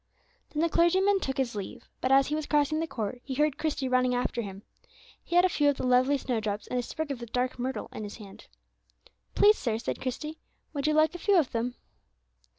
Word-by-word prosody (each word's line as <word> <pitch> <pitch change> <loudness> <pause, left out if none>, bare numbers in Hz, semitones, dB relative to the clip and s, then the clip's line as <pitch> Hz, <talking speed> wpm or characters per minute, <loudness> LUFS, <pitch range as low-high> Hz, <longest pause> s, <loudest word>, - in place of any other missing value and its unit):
Then 305 +1 -1
the 335 - +2
clergyman 380 +5 +3
took 265 -7 -3
his 260 -3 0
leave, 210 +4 -7
but, 255 - 0
as 270 0 +6
he - - -2
was 310 -1 -2
crossing 295 +1 +2
the 325 - -1
court, 235 -2 -4
he 265 - -5
heard 300 0 +1
Christie 295 -4 -1
running 255 -1 +2
after 245 -1 -1
him. 195 -2 -8 0.6
He 345 - -4
had 355 +1 +6
a - - +6
few 295 -5 +2
of 285 - 0
the - - -3
lovely 255 +3 +4
snowdrops 220 -5 -2
and 250 - -2
a - - +1
sprig 300 +5 -4
of 265 - -4
the 235 - -7
dark 250 +2 -2
myrtle 260 +2 -3
in 215 - -6
his 205 - -7
hand. 200 -3 -13 0.9
"Please, 420 +1 +6
sir," 225 -4 -1
said 230 - -4
Christie, 300 +5 -4 0.3
"would 285 0 -1
you 305 - +2
like 310 +1 +4
a 350 - -7
few 400 +2 +3
of 310 -7 +2
them?" 240 +2 -2
265 Hz, 230 wpm, -28 LUFS, 245-310 Hz, 0.9 s, as